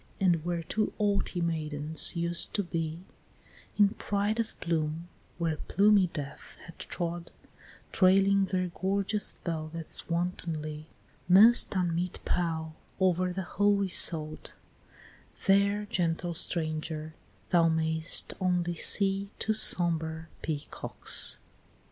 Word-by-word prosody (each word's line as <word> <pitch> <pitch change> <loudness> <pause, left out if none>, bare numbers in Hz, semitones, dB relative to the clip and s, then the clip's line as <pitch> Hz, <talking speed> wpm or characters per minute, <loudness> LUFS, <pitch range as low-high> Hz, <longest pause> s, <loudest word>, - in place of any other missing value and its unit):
And 175 -5 +2
where 170 -1 -2
two 215 +6 -1
haughty 200 -3 0
maidens 155 -2 -1
used 170 0 +1
to 205 - +1
be, 165 -2 -4 0.8
In 205 -1 +6
pride 205 +2 -2
of 225 -1 -3
plume, 165 0 -2 0.3
where 165 -2 -1
plumy 200 0 +4
Death 145 -4 -8
had 170 - -14
trod, 170 -1 -4 0.6
Trailing 195 +1 +4
their 185 -1 -1
gorgeous 195 +4 -1
velvets 165 -1 -4
wantonly, 160 -3 -3 0.4
Most 215 +4 +7
unmeet 175 -1 -1
pall, 160 -2 -2 0.2
over 185 -1 +2
the 190 +1 -3
holy 200 +1 +1
sod; 155 -3 0 1.0
There, 200 +1 +3
gentle 175 -2 -1
stranger, 155 -1 -1 0.4
thou 170 -2 +4
may'st 160 0 +2
only 180 -1 +1
see 195 +3 -1
Two 220 - 0
sombre 160 -5 +1
Peacocks. 155 -2 0
175 Hz, 105 wpm, -29 LUFS, 160-195 Hz, 1.0 s, Most